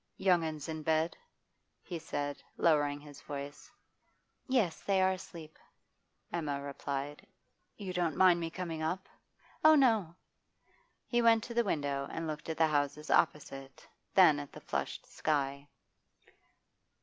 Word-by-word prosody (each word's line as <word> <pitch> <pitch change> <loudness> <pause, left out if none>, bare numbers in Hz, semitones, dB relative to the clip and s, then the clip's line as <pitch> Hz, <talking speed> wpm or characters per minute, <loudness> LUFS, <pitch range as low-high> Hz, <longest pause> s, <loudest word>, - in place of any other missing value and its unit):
'Young 180 -3 +3
'uns 155 -2 -4
in 160 -1 -4
bed?' 160 +2 +1 0.7
he 175 -2 -5
said, 145 -2 -4 0.2
lowering 145 -3 +3
his 145 -1 -12
voice. 145 0 -7 0.8
'Yes, 240 - +1
they 195 -1 +1
are 190 0 +4
asleep,' 170 -4 -8 0.7
Emma 150 -5 -1
replied. 140 +4 -5 0.5
'You 195 -3 -5
don't 175 -4 0
mind 185 -2 +6
me 165 -1 -2
coming 165 -2 -5
up?' 180 +5 -2 0.6
'Oh 310 0 +8
no!' 220 - +3 0.9
He 240 -1 +1
went 225 -1 +5
to 235 - -6
the 235 0 +3
window 140 -7 -1
and 165 - -4
looked 155 0 -5
at 160 - -2
the 160 - +5
houses 145 0 -1
opposite, 135 -4 0 0.3
then 170 -6 +7
at 145 -1 -7
the - - -9
flushed - - -3
sky. 140 -2 -1
160 Hz, 135 wpm, -32 LUFS, 145-185 Hz, 0.9 s, Oh